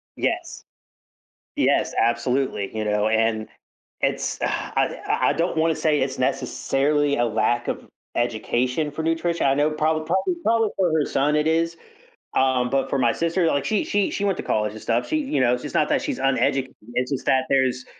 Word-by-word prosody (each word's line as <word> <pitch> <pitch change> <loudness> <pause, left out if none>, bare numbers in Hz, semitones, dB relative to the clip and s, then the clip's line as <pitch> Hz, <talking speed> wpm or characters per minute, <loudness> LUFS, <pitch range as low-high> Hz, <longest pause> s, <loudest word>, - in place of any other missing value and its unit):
Yes, - - -2 0.9
yes, - - +1
absolutely, 120 -3 0
you 110 - -1
know, 105 0 +1
and 110 0 +1 0.5
it's, - - -1
ugh - - +1
I - - -1
I - - +2
I - - +3
don't 165 +1 -1
wanna 160 0 +2
say 150 -2 +1
it's 130 0 -2
necessarily 140 +2 0
a 120 - +2
lack 120 +1 0
of - - -4 0.3
education 125 +5 0
for 155 +2 -5
nutrition. 165 0 0
I 135 - +3
know 145 +2 +2
proba 155 +1 0
probably 190 - +1
probably, 225 -1 +2
for 180 -4 +2
her 155 -2 +2
son 145 +2 +1
it 150 0 +1
is, 165 +1 +1 0.6
um, 130 -2 +2
but 135 +1 0
for 140 - 0
my 120 -2 +3
sister, 170 +2 0
like 140 -3 0
she 215 -2 +1
she 205 -1 0
she 205 - -2
went 195 -3 +1
to - - -4
college 105 -1 0
and 110 - -10
stuff. 120 +1 0
She 310 - 0
you 270 - -1
know, 125 -1 +3
it's 125 - -7
not - - +2
that - - +2
she's - - -3
uneducated, 135 0 +1 0.2
it's 125 +1 -1
just 135 - -3
that 130 0 +3
there's, 130 -1 +1
135 Hz, 195 wpm, -23 LUFS, 125-160 Hz, 0.9 s, I